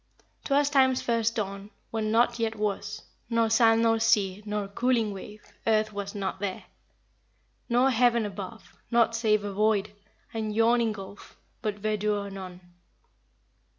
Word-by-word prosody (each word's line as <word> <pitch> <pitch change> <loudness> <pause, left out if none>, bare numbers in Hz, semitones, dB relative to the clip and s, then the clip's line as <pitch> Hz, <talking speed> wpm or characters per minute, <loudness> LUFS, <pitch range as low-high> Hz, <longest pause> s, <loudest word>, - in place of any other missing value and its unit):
"'Twas 280 0 +3
time's 260 -2 +4
first 230 -1 0
dawn, 200 -2 -4 0.2
When 220 -1 -1
nought 235 +1 +3
yet 225 -1 -1
was, 210 -1 -3 0.3
Nor 230 -1 +2
sand 225 0 +5
nor 225 0 +3
sea, 210 -4 +2
Nor 210 -1 -2
cooling 230 0 0
wave; 205 +2 -10 0.2
Earth 215 -1 +2
was 200 0 -5
not 195 -2 -3
there, 195 -2 -4 1.1
Nor 250 +3 +4
heaven 235 -2 +3
above. 205 +2 -8
Nought 235 -1 +3
save 215 -2 +2
a 205 -1 -4
void 210 0 +1 0.4
And 215 -2 -3
yawning 230 0 +3
gulf. 200 0 -11 0.2
But 215 -3 -2
verdure 210 -1 -1
none.'" 185 -2 -8
215 Hz, 140 wpm, -27 LUFS, 205-230 Hz, 1.1 s, sand